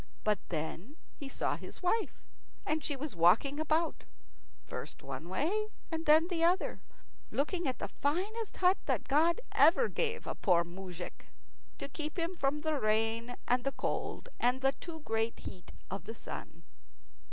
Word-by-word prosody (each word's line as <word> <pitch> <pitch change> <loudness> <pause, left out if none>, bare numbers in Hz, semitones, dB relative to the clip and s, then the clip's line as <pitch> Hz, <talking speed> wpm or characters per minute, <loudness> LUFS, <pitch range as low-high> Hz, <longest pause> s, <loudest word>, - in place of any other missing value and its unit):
But 210 -1 +2
then 170 - -4 0.2
he 280 - -7
saw - - 0
his - - -9
wife. 430 +5 0 0.4
And 310 -1 0
she 290 - 0
was 275 -4 -5
walking 215 - +5
about, 315 +2 +1 0.6
first - - -7
one 170 - -6
way 370 - +1 0.2
and 325 0 -3
then 315 +2 +7
the 340 -3 0
other, 355 +3 +2 0.5
looking 340 +4 0
at 255 - -1
the - - -3
finest 390 +10 -1
hut 370 +1 +4
that - - 0
God 325 - +4
ever 370 +9 +6
gave 470 0 -1
a - - -2
poor 175 -4 +3
moujik 180 0 -8 0.5
to - - -4
keep 305 +4 -5
him 340 +2 -1
from 285 -1 0
the 310 -2 0
rain 225 +2 +1
and 245 0 +3
the 275 - 0
cold, 480 - -2
and 250 +2 +2
the 270 0 +4
too 320 +3 -8
great 225 -3 0
heat 180 - -8 0.2
of 195 - -4
the 225 - -6
sun. 170 -5 -8
285 Hz, 165 wpm, -33 LUFS, 225-335 Hz, 0.6 s, then